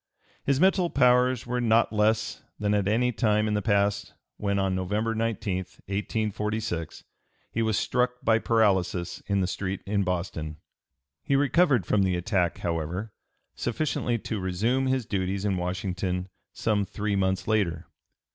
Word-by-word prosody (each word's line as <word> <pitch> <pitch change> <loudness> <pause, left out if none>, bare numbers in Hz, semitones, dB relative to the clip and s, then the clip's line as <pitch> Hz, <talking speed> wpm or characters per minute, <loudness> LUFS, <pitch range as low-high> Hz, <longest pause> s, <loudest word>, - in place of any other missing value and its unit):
His 140 -1 +1
mental 185 0 +4
powers 125 -2 +3
were 125 0 -1
not 115 -1 +3
less 110 +1 +1 0.2
than 105 0 0
at 100 -2 +1
any 120 +4 +2
time 105 -2 +2
in 105 - 0
the 105 - +1
past 100 -1 +1 0.2
when, 100 -1 -1
(p. - - +1
307) - - +1
on 95 -1 0
November 105 +5 -1
19, 110 -4 -1
1846, 105 -1 -3 0.5
he 115 - -1
was 110 -2 +1
struck 125 0 +1
by 110 0 +4
paralysis 95 -6 +1
in 100 -1 +1
the - - +2
street 95 +1 -3
in 100 0 0
Boston. 85 -4 -3 0.6
He 140 - 0
recovered 145 - +3
from 105 - +2
the 95 -2 +2
attack, 90 -1 0
however, 85 +5 -3 0.4
sufficiently 120 -1 -1
to 110 -1 -4
resume 110 +9 0
his 130 -2 0
duties 95 -1 -2
in 100 -2 +1
Washington 90 0 -2 0.2
some 105 -2 0
three 100 +1 -2
months 95 -1 0
later. 100 -7 0
105 Hz, 155 wpm, -27 LUFS, 95-115 Hz, 0.6 s, mental